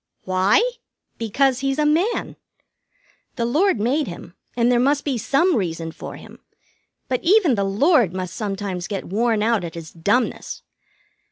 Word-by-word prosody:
"Why? 190 - +3 0.5
Because 250 +4 +1
he's 275 0 -1
a 300 - +2
Man. 345 +10 +1 1.0
The 235 - -1
Lord 310 - +2
made 260 +6 +1
him, 170 0 -9 0.2
and 240 +1 +3
there 240 - +3
must 280 +3 +1
be 280 -3 0
some 325 - +2
reason 165 -5 -2
for - - -9
him; - - -13 0.7
but 255 -1 -2
even 370 - +4
the 200 -3 0
Lord 220 - +3
must 185 -1 -5
sometimes 195 -4 -4
get 200 -2 -4
worn 220 +2 0
out 225 -4 +1
at 170 -1 -6
his 165 -1 -8
dumbness. 205 +9 -1
235 Hz, 155 wpm, -22 LUFS, 195-280 Hz, 1.0 s, even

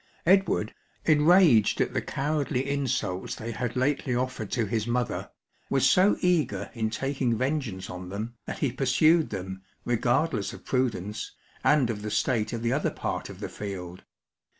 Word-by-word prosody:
Edward, 190 +1 +3 0.3
enraged 155 - +5
at - - +1
the - - 0
cowardly 140 -2 -1
insults 125 -9 -1
they 115 +1 -5
had 120 +1 -3
lately 130 0 0
offered 125 -4 -2
to 115 -3 0
his 110 +2 -1
mother,* 120 0 -1 0.4
was 135 -1 +3
so 185 +8 +4
eager 180 -4 +1
in 110 -3 -1
taking 130 0 -1
vengeance 130 -8 -2
on 90 0 -7
them, 110 +5 -4
that - - -4
he 130 - 0
pursued 150 +6 +3
them, 95 -1 -5 0.2
regardless 120 0 +1
of - - -12
prudence, 110 -6 -2 0.3
and 140 -6 +4
of 105 -2 -5
the 105 - -4
state 110 0 0
of 115 -1 -4
the 120 +1 +1
other 145 - +1
part - - -4
of - - -10
the - - -3
field. 90 -3 -7
125 Hz, 160 wpm, -27 LUFS, 110-140 Hz, 0.4 s, enraged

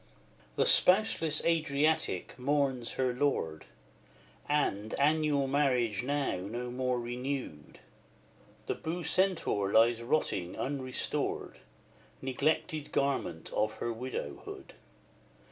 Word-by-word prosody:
XI. - - -30
The - - +2
spouseless 180 -5 +4
Adriatic 155 - +1
mourns 135 -3 0
her 130 -1 0
lord; 120 - -1 0.8
And, 110 -8 0
annual 150 -1 +3
marriage 130 -7 +1
now 140 -3 -1
no 120 +7 -5
more 125 0 0
renewed, 125 - -5 0.9
The - - -1
Bucentaur 170 - 0
lies 115 +2 +4
rotting 115 - -1
unrestored, 130 -2 -2 0.6
Neglected 145 +3 -1
garment 130 -12 -1
of 110 0 +1
her 120 +1 -3
widowhood! 115 - -6
130 Hz, 95 wpm, -31 LUFS, 115-145 Hz, 0.9 s, spouseless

